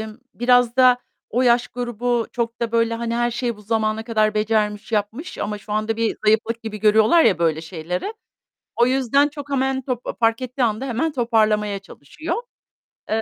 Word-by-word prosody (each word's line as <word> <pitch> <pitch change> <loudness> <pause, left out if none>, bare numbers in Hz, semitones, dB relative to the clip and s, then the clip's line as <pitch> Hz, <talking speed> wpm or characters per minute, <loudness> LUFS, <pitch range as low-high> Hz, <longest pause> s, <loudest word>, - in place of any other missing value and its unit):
emm, 220 -1 -7 0.2
biraz 245 0 +3
da 255 -1 +6 0.3
o 245 - +1
yaş 240 -1 +3
grubu 240 -1 -2
çok 235 -1 -3
da 235 -1 -2
böyle, 230 0 +2
hani, 230 0 -3
her 240 0 +1
şeyi 240 -1 -2
bu 210 - -15
zamana 220 0 -1
kadar 215 -2 +1
becermiş, 210 0 0
yapmış 220 - -2
ama 210 0 -3
şu 210 +1 -8
anda 215 +1 -1
bir 230 -1 0
zayıflık 220 +2 +2
gibi 215 -2 -6
görüyorlar 220 - +5
ya 185 - +3
böyle 160 -2 +1
şeyleri, 175 - -4 0.6
o 240 - +4
yüzden 270 +2 +2
çok 290 -1 -9
hemen 265 -1 0
top 250 -2 -4
fark 230 +1 +2
ettiği 255 +1 -3
anda 230 +3 0
hemen 265 +6 -1
toparlamaya 215 -5 +1
çalışıyor. 315 - -6 0.7
Eee 220 +1 +1
230 Hz, 175 wpm, -21 LUFS, 215-245 Hz, 0.7 s, da